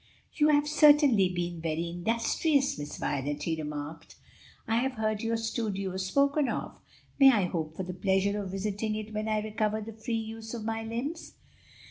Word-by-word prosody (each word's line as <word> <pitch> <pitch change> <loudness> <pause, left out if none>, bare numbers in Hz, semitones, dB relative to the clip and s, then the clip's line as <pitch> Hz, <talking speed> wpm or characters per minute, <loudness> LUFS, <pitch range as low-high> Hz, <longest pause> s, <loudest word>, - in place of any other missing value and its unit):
"You 300 -1 +3
have 295 -1 +4
certainly 290 - +6
been 175 -2 -3
very 165 +1 -2
industrious, 230 - +1
Miss 145 0 -6
Violet," 145 +1 -2
he 165 0 0
remarked. 150 +1 -7 0.5
"I 225 - +2
have 265 +2 0
heard 215 -2 -1
your 230 0 0
studio 210 -4 -2
spoken 280 +9 +2
of. - - -4 0.4
May 270 -1 +9
I 210 -7 +2
hope 160 -3 -3
for 190 - -2
the 180 0 -5
pleasure 195 +2 +1
of 195 - -5
visiting 205 +3 -2
it 215 0 -6
when 215 +1 -2
I 215 -1 0
recover 215 0 -1
the 220 +1 -7
free 225 +2 -4
use 225 +1 -5
of 220 -2 -6
my 225 0 -2
limbs?" 240 +9 -5
215 Hz, 175 wpm, -29 LUFS, 185-230 Hz, 0.5 s, May